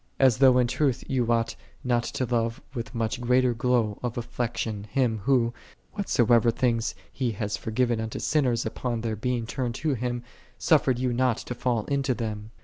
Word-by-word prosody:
As 130 -3 +4
though 130 -2 +6
in 125 - +4
truth 130 +1 0
you 125 -3 +1
ought 115 -1 +1 0.3
not 120 -2 +2
to 130 - -2
love 115 -1 0
with 115 -2 -5
much 115 +1 -1
greater 125 0 +3
glow 115 -3 +1
of 125 -1 -3
affection 115 -3 -3
Him, 115 -1 0
Who, 120 -4 +3 0.4
whatso 190 - +1
ever 120 0 +5
things 115 -1 0 0.2
He 125 -4 -1
hath 105 0 -2
forgiven 115 0 0
unto 110 0 -4
sinners 125 -6 +1
upon 120 -3 -2
their 110 -1 -2
being 120 +2 -1
turned 120 0 -3
to 155 -2 0
Him, 120 0 -2 0.3
suffered 135 -2 +3
you 125 -1 0
not 125 -1 +2
to - - -5
fall 120 -3 -1
into 140 -2 0
them. 110 -2 -4
120 Hz, 180 wpm, -26 LUFS, 115-130 Hz, 0.4 s, though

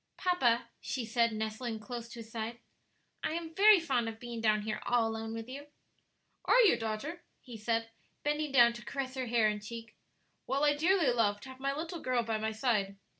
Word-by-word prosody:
"Papa," 245 -11 +2
she 255 -3 -3
said, 230 +1 +2
nestling 220 +1 -3
close 235 +1 -7
to 235 -1 -8
his 225 0 -13
side, 230 +1 -4 0.7
"I - - -1
am 330 -1 -4
very 410 +2 +7
fond 260 -8 0
of 225 0 -9
being 235 -1 -6
down 215 -1 +2
here 215 0 -3
all 240 -2 +2
alone 225 0 -4
with 225 0 -5
you." 280 +3 -8 0.8
"Are - - +6
you, 430 - +6
daughter?" 225 +10 -4 0.2
he 245 -3 -11
said, 225 +1 -1 0.3
bending 295 0 0
down 240 -3 +6
to 235 - -9
caress 270 -2 -4
her 260 -2 -3
hair 230 -2 +3
and 210 -1 -2
cheek. 230 +1 -8 0.5
"Well, 275 +3 0
I 295 0 +5
dearly 330 -2 +3
love 205 -4 +2
to 260 - -10
have 260 0 -11
my 275 +1 -1
little 330 +3 -4
girl 255 -4 0
by 225 -1 -1
my 220 0 -1
side. 215 -4 0
235 Hz, 205 wpm, -32 LUFS, 225-275 Hz, 0.8 s, very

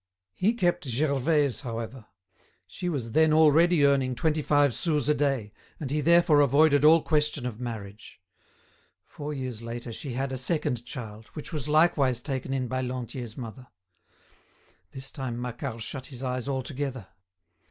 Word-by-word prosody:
He 215 - +1
kept 175 -8 +1
Gervaise, 140 +1 +1
however; 115 -1 -6 0.6
she 180 - -5
was 130 -8 -3
then 160 +4 +4
already 160 +1 +5
earning 135 -2 +2
twenty 155 +4 0
five 145 -3 +3
sous 150 -3 0
a 150 - +4
day, 135 -8 -1 0.3
and 140 -4 -4
he 150 +1 +1
therefore 170 -1 +5
avoided 145 +1 +4
all 160 +1 +7
question 150 -4 0
of 120 -3 -5
marriage. 110 -5 -7 0.9
Four 150 0 -7
years 130 -5 -5
later 115 0 -6
she 135 +2 -6
had 135 +2 -2
a 130 - -3
second 130 -5 -1
child, 110 -3 -8
which 155 +3 -7
was 150 -2 -3
likewise 150 -5 +3
taken 135 0 -4
in 130 -2 -1
by 130 +2 -2
Lantier's 125 -2 -5
mother. 125 0 -8 1.2
This 135 +6 -6
time 125 -3 -4
Macquart 120 -1 -5
shut 135 +2 -6
his 130 -1 -9
eyes 125 0 -2
altogether. 130 -3 -3
135 Hz, 155 wpm, -27 LUFS, 120-150 Hz, 1.2 s, all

